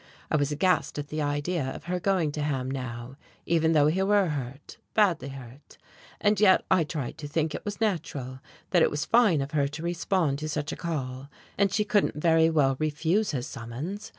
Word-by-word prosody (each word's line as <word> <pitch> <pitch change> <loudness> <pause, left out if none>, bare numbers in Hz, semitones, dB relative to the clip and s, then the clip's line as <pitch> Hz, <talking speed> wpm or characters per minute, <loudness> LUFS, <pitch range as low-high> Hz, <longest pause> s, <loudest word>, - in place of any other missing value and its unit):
I - - +3
was 145 -1 +1
aghast 180 +3 +1
at 145 -1 -5
the 155 0 -3
idea 145 +3 -1
of 130 - -5
her 180 +1 -2
going 180 -5 +1
to 150 - -4
Ham 135 -3 -1
now 125 -1 -6 0.3
even 165 -1 +2
though 150 -2 +5
he 165 +6 +2
were 200 -2 +3
hurt 140 -1 -6 0.2
badly 200 -9 +3
hurt; 135 0 -11 0.4
and 205 -1 +2
yet 195 -3 +5
I 185 -3 +5
tried 150 -5 -5
to 145 - -5
think 155 +1 -1
it - - -5
was 205 -1 -5
natural, 145 - -2 0.3
that 175 - +4
it - - +5
was 150 0 -2
fine 215 - +4
of 135 +1 -4
her 145 -2 +1
to 150 +3 -7
respond 170 -4 0
to 155 0 -4
such 150 +1 -2
a - - -4
call. 135 -5 -4 0.3
And 200 -1 +2
she 210 +1 +1
couldn't 205 -1 +1
very 160 +1 +4
well 140 -4 +2
refuse 160 +7 +1
his 125 -4 -2
summons. 160 - -6
155 Hz, 205 wpm, -27 LUFS, 140-180 Hz, 0.4 s, though